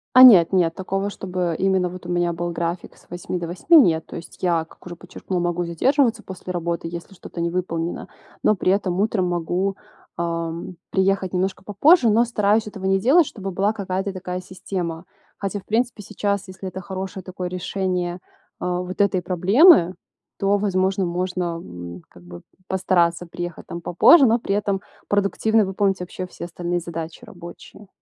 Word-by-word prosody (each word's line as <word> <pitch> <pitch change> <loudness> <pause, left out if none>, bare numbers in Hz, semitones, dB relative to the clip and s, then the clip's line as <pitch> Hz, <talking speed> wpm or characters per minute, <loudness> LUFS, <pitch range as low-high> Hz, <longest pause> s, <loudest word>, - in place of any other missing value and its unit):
А 255 - +10
нет, 190 -10 +9
нет 175 -3 +2
такого, 195 +1 -2
чтобы 180 -4 -3
именно 190 -1 +2
вот 180 0 -9
у - - -7
меня 175 -1 +1
был 175 +1 -3
график 170 +1 -4
с - - -24
8 175 +1 -4
до 170 - -4
8, 185 - +4
нет. 165 - +4
То - - -8
есть 170 - -12
я, 170 -2 +1
как 165 - -21
уже 175 -1 -8
подчеркнула, 180 +1 -5
могу 175 0 -1
задерживаться 230 - +1
после 185 -2 -8
работы, 170 -1 -3
если 170 +3 -8
что-то 175 - -10
не 170 0 0
выполнено, 170 -1 -3 0.3
но 215 - +4
при 185 +2 +2
этом 190 -2 -1
утром 205 -3 +1
могу, 180 +3 -1 0.4
эм, 170 +1 -3
приехать 190 -1 +1
немножко 190 +1 -1
попозже, 235 - +4
но 225 +3 +4
стараюсь 215 -2 +1
этого 195 -2 -7
не 195 0 +3
делать, 290 - +5
чтобы 195 -6 -6
была 195 +3 +1
какая-то 195 -1 -3
такая 185 -1 -5
система. 180 -2 -5 0.3
Хотя 200 0 -3
в - - -31
принципе 225 -1 -1
сейчас, 200 -1 -2
если 190 0 -8
это 185 +1 -6
хорошее 190 0 -6
такое 185 -1 -5
решение, 180 -1 -2 0.4
э, - - -4
вот 180 +1 -3
этой 195 -2 +2
проблемы, 185 - +5 0.4
то, 200 +1 +2
возможно, 190 -1 0
можно, 180 +1 -2 0.2
м, 85 0 -9
как 90 - -17
бы 85 0 -11 0.3
постараться 175 -2 +1
приехать 175 0 -6
там 170 - -6
попозже, 180 - +6
но 230 0 +3
при 200 -3 -1
этом 200 -2 -1 0.3
продуктивно 205 +2 +2
выполнить 195 0 0
вообще 180 +1 -6
все 170 - -8
остальные 175 0 -3
задачи 165 +4 -7
рабочие. 190 0 -12
185 Hz, 175 wpm, -22 LUFS, 175-200 Hz, 0.4 s, А